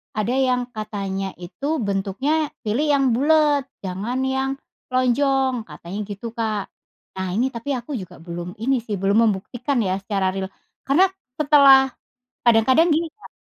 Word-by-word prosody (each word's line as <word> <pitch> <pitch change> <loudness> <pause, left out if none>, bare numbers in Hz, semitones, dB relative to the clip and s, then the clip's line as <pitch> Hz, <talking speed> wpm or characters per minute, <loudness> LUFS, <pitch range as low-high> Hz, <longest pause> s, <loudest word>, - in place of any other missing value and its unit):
ada 215 +3 0
yang 250 -2 +2
katanya 195 -3 -3
itu 240 - -3
bentuknya 230 +10 0 0.2
pilih 255 +9 +1
yang 275 -1 +3
bulet 295 0 +3 0.2
jangan 200 +8 -3
yang 265 0 0 0.4
lonjong, 255 -1 +2
katanya 170 +6 -8
gitu, 210 +3 -6
Kak. 215 -3 -2 0.5
Nah, 190 0 -3
ini 250 +4 +2
tapi 240 +5 -5
aku 250 +4 -6
juga 185 -6 -7
belum 175 +1 -6
ini 260 +3 +1
sih, 210 -3 -3
belum 200 +2 +2
membuktikan 245 +7 -2
ya 185 -1 0
secara 195 -2 0
ril 190 0 -3 0.4
karena 350 +8 +5 0.3
setelah 280 -3 +7 0.6
kadang-kadang 255 +9 +5
gini, 330 +1 0
Kak, 420 - -15
240 Hz, 145 wpm, -22 LUFS, 195-275 Hz, 0.6 s, setelah